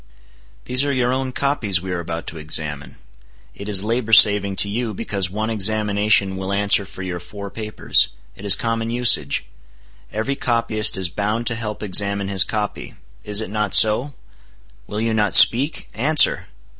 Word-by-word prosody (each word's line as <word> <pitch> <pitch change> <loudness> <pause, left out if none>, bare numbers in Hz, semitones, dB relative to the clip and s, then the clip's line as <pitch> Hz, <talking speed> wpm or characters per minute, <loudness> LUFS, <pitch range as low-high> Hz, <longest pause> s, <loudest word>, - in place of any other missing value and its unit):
"These 125 +2 +1
are 145 - -1
your 125 -2 0
own 130 0 -3
copies 125 -9 -1
we 95 +1 -7
are 90 - -3
about 85 0 -6
to 80 0 -6
examine. 75 -2 -4 0.6
It 100 +1 -9
is 100 -2 +3
labor 115 +1 -2
saving 100 -2 +5
to 100 - +1
you, 110 +1 -4
because 95 -3 -2
one 110 +4 -4
examination 105 -2 +1
will 95 0 -5
answer 100 0 +2
for 95 +3 -10
your 90 -1 -5
four 100 +3 -10
papers. 110 -1 0 0.3
It 95 - -14
is 100 -1 +7
common 115 -1 -3
usage. 120 - +2 0.7
Every 110 +7 -3
copyist 115 -5 0
is 95 -2 -2
bound 105 +5 -3
to 115 - -2
help 110 -2 -6
examine 100 0 +1
his 95 -3 +4
copy. 105 +5 -5 0.3
Is 105 0 0
it 110 - -7
not 105 -2 -1
so? 120 +6 +3 0.7
Will 105 - -5
you 115 0 -1
not 105 -2 +1
speak? 135 +7 +4
Answer!" 145 +7 +2
105 Hz, 170 wpm, -19 LUFS, 100-115 Hz, 0.7 s, is